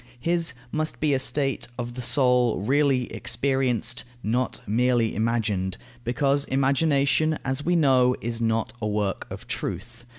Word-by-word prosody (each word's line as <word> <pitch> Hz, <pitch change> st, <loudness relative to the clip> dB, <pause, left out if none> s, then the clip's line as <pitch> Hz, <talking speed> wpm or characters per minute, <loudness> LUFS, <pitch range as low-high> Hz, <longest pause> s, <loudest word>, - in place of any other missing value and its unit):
His 170 Hz, +2 st, +1 dB, 0.2 s
must 155 Hz, 0 st, -2 dB
be 150 Hz, -2 st, +2 dB
a 135 Hz, -, +2 dB
state 135 Hz, +2 st, -1 dB
of 120 Hz, -1 st, -4 dB
the 125 Hz, -, -6 dB
soul 125 Hz, -2 st, +3 dB
really 135 Hz, +2 st, +2 dB
experienced, 125 Hz, -1 st, 0 dB, 0.2 s
not 125 Hz, +4 st, -1 dB
merely 120 Hz, +1 st, +2 dB
imagined, 105 Hz, -5 st, -1 dB, 0.3 s
because 140 Hz, +4 st, +1 dB
imagination, 140 Hz, +3 st, +2 dB
as 135 Hz, +2 st, -1 dB
we 175 Hz, +3 st, +1 dB
know, 130 Hz, -5 st, +4 dB
is 115 Hz, 0 st, -3 dB
not 115 Hz, -1 st, 0 dB
a 105 Hz, -, -1 dB
work 105 Hz, -2 st, -2 dB
of -, -, -8 dB
truth. 120 Hz, +1 st, -5 dB
125 Hz, 140 wpm, -25 LUFS, 115-140 Hz, 0.3 s, know